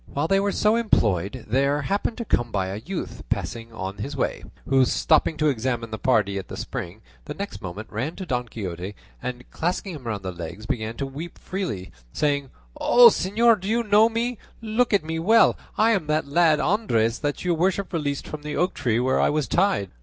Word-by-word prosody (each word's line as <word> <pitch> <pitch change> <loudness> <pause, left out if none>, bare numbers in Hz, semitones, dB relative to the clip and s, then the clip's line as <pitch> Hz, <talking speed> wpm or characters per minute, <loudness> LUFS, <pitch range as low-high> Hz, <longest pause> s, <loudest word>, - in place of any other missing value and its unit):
While 145 +3 -1
they 195 +3 +3
were 200 0 +1
so 210 +2 +2
employed 110 - +1
there 140 +5 +1
happened 200 +7 -1
to 235 - -4
come 120 - 0
by 95 -2 -1
a 100 +3 -5
youth 185 +5 -5
passing 115 0 -3
on 95 -2 -5
his 140 +6 -5
way, - - -1 0.2
who 135 -1 +4
stopping 155 +4 +2
to 155 0 +2
examine 120 -3 -2
the 110 - -4
party 105 -6 +2
at 95 - -8
the - - -7
spring, - - -6 0.2
the - - -6
next 200 -8 -6
moment 95 +3 -6
ran 130 +10 -3
to 190 - -6
Don 125 -6 -2
Quixote 95 -3 -6 0.3
and 125 0 -5
clasping 180 +3 -2
him 140 -6 -9
round 105 -4 -3
the 95 - -3
legs, 85 +4 -8
began 110 0 -3
to 140 - -2
weep 145 +6 -7
freely, 175 - -4 0.2
saying, 140 -2 0 0.3
"O, 240 -1 +8
señor, 220 +3 +3
do 190 - -6
you 235 +2 +1
not 210 - -14
know 215 +2 +7
me? 235 +1 -2 0.2
Look 230 +2 0
at 200 -5 +3
me 160 +1 -3
well; 220 +7 +5 0.2
I 220 +2 +4
am 190 -9 0
that 155 -1 0
lad 155 +1 +4
Andres 120 - +1
that 145 +4 -3
your 175 - +2
worship 185 +3 0
released 145 -4 -2
from 155 - -6
the 150 0 -4
oak 180 +1 +1
tree 120 -3 0
where 130 +1 +2
I - - +3
was 150 -2 0
tied." 190 - +1
145 Hz, 215 wpm, -24 LUFS, -, 0.3 s, O